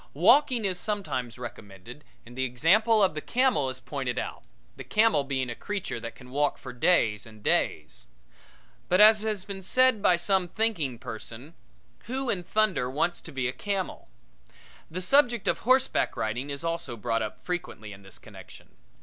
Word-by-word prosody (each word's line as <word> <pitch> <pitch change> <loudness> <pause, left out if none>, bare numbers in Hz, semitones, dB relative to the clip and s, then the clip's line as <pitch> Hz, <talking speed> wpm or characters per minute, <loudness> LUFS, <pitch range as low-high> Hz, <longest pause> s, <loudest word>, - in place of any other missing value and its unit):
Walking 255 -6 +4
is 185 -2 -1
sometimes 155 - -3
recommended 120 +1 -10 0.2
and 120 +1 -13
the 130 - -1
example 200 - +3
of 185 - +3
the 155 - -5
camel 245 - +1
is 130 0 -6
pointed 130 -1 -4
out, - - -4 0.3
the - - -8
camel 215 -9 +3
being 135 -2 -2
a 120 - -4
creature 200 - -4
that 115 0 -7
can 125 -1 -14
walk 145 +2 +1
for 130 - -9
days 120 - +2
and 110 -2 -15
days. 75 -4 -1 0.8
But, 180 - +3
as 215 0 +8
has 215 -3 -3
been 195 -2 -6
said 255 +3 +3
by 180 - +5
some 185 +1 +1
thinking 175 - -1
person, 115 +6 -8 0.5
who 260 +2 -2
in 185 - -1
thunder 190 -10 +1
wants 150 +6 -1
to - - -11
be 130 -2 -2
a 125 - -3
camel? 195 +1 -4 0.8
The 185 +3 -5
subject 240 -2 +3
of - - +1
horseback 260 +2 +2
riding 120 +6 -2
is 140 +2 -5
also 165 -7 -3
brought 115 +1 -1
up 110 -1 -5
frequently 165 - -5
in 95 - -13
this 95 -1 -10
connection. - - -14
160 Hz, 175 wpm, -27 LUFS, -, 0.8 s, as